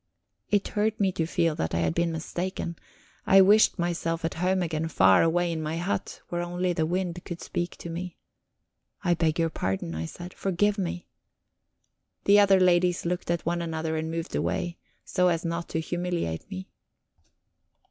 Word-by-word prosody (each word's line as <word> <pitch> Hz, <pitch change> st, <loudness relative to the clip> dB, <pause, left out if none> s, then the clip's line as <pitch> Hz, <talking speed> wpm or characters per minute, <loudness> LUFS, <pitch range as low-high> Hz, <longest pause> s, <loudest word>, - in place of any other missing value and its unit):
It 205 Hz, -1 st, +1 dB
hurt 215 Hz, +1 st, 0 dB
me 195 Hz, -2 st, +3 dB
to 165 Hz, -3 st, -1 dB
feel 165 Hz, -1 st, +1 dB
that 80 Hz, -, -1 dB
I 85 Hz, -, +1 dB
had 80 Hz, -1 st, +1 dB
been 170 Hz, -, +1 dB
mistaken; 170 Hz, +2 st, -4 dB, 0.5 s
I 195 Hz, -, +7 dB
wished 205 Hz, +3 st, +6 dB
myself 165 Hz, -1 st, -1 dB
at 165 Hz, -, -1 dB
home 185 Hz, +2 st, +1 dB
again, 160 Hz, -1 st, -2 dB
far 95 Hz, -, +5 dB
away 170 Hz, +1 st, +2 dB
in 160 Hz, -1 st, -3 dB
my 155 Hz, +1 st, -2 dB
hut, 175 Hz, +4 st, -3 dB
where 175 Hz, 0 st, -2 dB
only 175 Hz, +1 st, -1 dB
the 160 Hz, -2 st, 0 dB
wind 180 Hz, 0 st, -2 dB
could 170 Hz, -1 st, -6 dB
speak 175 Hz, 0 st, -3 dB
to -, -, -8 dB
me. 175 Hz, +1 st, -5 dB, 0.9 s
"I 175 Hz, -2 st, +3 dB
beg 165 Hz, -1 st, +1 dB
your 165 Hz, -1 st, +1 dB
pardon," 95 Hz, -, -2 dB
I 80 Hz, +1 st, -3 dB
said; 175 Hz, -, -9 dB
"forgive 200 Hz, +2 st, 0 dB
me." 175 Hz, -1 st, -3 dB, 1.2 s
The 205 Hz, +1 st, +6 dB
other 195 Hz, -2 st, +6 dB
ladies 180 Hz, -1 st, +3 dB
looked 175 Hz, 0 st, -2 dB
at 170 Hz, -1 st, 0 dB
one 170 Hz, +1 st, 0 dB
another 160 Hz, -1 st, -2 dB
and 160 Hz, 0 st, -2 dB
moved 165 Hz, +1 st, -4 dB
away, 175 Hz, 0 st, -2 dB, 0.3 s
so 180 Hz, -1 st, +2 dB
as 170 Hz, -1 st, 0 dB
not 170 Hz, 0 st, -3 dB
to 160 Hz, -, -1 dB
humiliate 175 Hz, -, -3 dB
me. 95 Hz, +1 st, -6 dB
170 Hz, 180 wpm, -27 LUFS, 160-180 Hz, 1.2 s, I